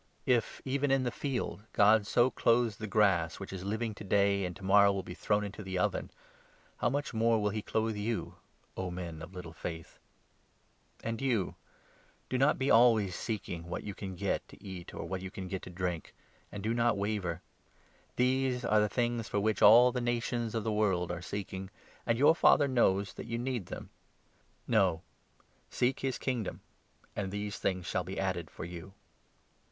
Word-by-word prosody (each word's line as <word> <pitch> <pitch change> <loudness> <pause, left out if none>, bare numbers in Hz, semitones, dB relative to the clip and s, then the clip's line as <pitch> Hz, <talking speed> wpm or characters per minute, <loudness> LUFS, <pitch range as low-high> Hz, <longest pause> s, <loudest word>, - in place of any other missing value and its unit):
If, 120 -3 +1
even 140 +1 0
in 135 -1 +3
the 120 - -1
field, 125 -6 -3
God 105 0 +5
so 120 +4 +3
clothes 115 -2 +2
the 110 - -5
grass 95 -6 +3
28 - - -12
which 95 -1 -7
is 95 -1 -6
living 110 +3 -2
to 105 - -10
day 100 0 +2
and 90 -1 -5
to 95 - -13
morrow 100 +1 +6
will 100 -1 -2
be 90 - -7
thrown 105 +3 0
into 100 +1 -6
the 95 -2 -4
oven, 90 - 0 0.7
how - - +1
much 145 +1 -2
more 115 0 +3
will 105 -1 +1
he 110 +1 -3
clothe 110 +1 -1
you, 105 +2 -2 0.4
O 95 -1 -3
men 85 -3 -6
of 90 +4 -10
little 85 -2 -7
faith! 80 -1 -7 1.0
And 115 +2 -3
you 120 -8 0 0.4
— - - -33
do 130 - +1
not 135 +3 +4
be 135 +1 +1
always 110 -5 +5
seeking 85 -6 -4
what 85 - -4
you 100 - -5
can 95 -1 -6
get - - -2
to - - -14
eat 95 -3 -7
29 - - -6
or - - -7
what 95 -1 -3
you 95 - -5
can 95 0 -7
get 95 0 -4
to - - -9
drink; 90 -2 -4 0.4
and 100 -1 -6
do 110 +2 0
not 120 -2 +2
waver. 100 -5 -2 0.7
These 125 0 +1
are 110 -1 +4
the 105 0 +2
30 - - -16
things 120 -2 0
for 100 - 0
which 110 +1 0
all 120 +4 +8
the 125 0 -2
nations 120 -1 -1
of 110 - -1
the 110 0 -1
world 95 -5 +1
are 90 0 -4
seeking, 95 0 -5 0.4
and 115 -1 +2
your 145 +5 +6
Father 145 -3 +5
knows 100 -6 +2
that - - -8
you 115 0 -2
need 120 -6 -3
them. - - -8 0.8
No, 80 +2 +2 0.7
seek 125 +2 0
his 135 -2 -1
Kingdom, 120 -6 -3 0.5
31 105 - -2
and 95 - -5
these 105 0 -4
things 90 -2 -1
shall - - -1
be - - -5
added - - -2
for - - -7
you. 90 +2 -9
105 Hz, 200 wpm, -31 LUFS, 95-120 Hz, 1.0 s, all